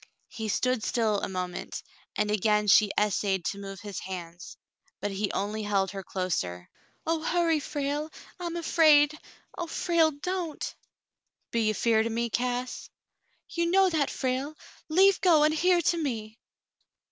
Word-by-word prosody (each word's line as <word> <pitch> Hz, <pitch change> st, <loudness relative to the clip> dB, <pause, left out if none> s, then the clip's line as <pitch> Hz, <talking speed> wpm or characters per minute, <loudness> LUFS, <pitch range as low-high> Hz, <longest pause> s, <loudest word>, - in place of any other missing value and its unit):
He 220 Hz, -3 st, -5 dB
stood 255 Hz, +3 st, +1 dB
still 215 Hz, -3 st, 0 dB
a -, -, -3 dB
moment, 180 Hz, -1 st, -5 dB, 0.3 s
and 210 Hz, 0 st, 0 dB
again 210 Hz, 0 st, +2 dB
she 205 Hz, +1 st, +6 dB
essayed 195 Hz, -3 st, 0 dB
to 200 Hz, -, -2 dB
move 195 Hz, -2 st, -8 dB
his 205 Hz, -3 st, -6 dB
hands, 175 Hz, -2 st, -8 dB, 0.4 s
but 205 Hz, -, -3 dB
he 195 Hz, +1 st, -2 dB
only 210 Hz, +2 st, -2 dB
held 200 Hz, -2 st, 0 dB
her 195 Hz, 0 st, -6 dB
closer. 125 Hz, -, -3 dB, 0.4 s
"Oh, 325 Hz, 0 st, 0 dB
hurry, 335 Hz, -1 st, +2 dB
Frale! 290 Hz, +1 st, -3 dB, 0.3 s
I'm 345 Hz, -1 st, -4 dB
afraid. 310 Hz, -3 st, +4 dB, 0.4 s
Oh, 345 Hz, -, -4 dB
Frale, 330 Hz, -1 st, +2 dB
don't 330 Hz, +2 st, -4 dB, 0.4 s
!" -, -, -54 dB
"Be 230 Hz, -2 st, +1 dB
ye 215 Hz, -, +2 dB
'feared 220 Hz, +1 st, +2 dB
fer -, -, -4 dB
me, 235 Hz, 0 st, -1 dB
Cass 250 Hz, +1 st, -2 dB, 0.3 s
?" -, -, -44 dB
"You 340 Hz, 0 st, +1 dB
know 380 Hz, +1 st, +4 dB
that, 295 Hz, -4 st, +1 dB
Frale. 265 Hz, +3 st, -2 dB, 0.3 s
Leave 380 Hz, +4 st, +5 dB
go, 325 Hz, -5 st, +5 dB
and 305 Hz, 0 st, +4 dB
hear 355 Hz, +3 st, +3 dB
to 340 Hz, +1 st, +1 dB
me." 225 Hz, -8 st, -4 dB
240 Hz, 160 wpm, -28 LUFS, 205-315 Hz, 0.4 s, she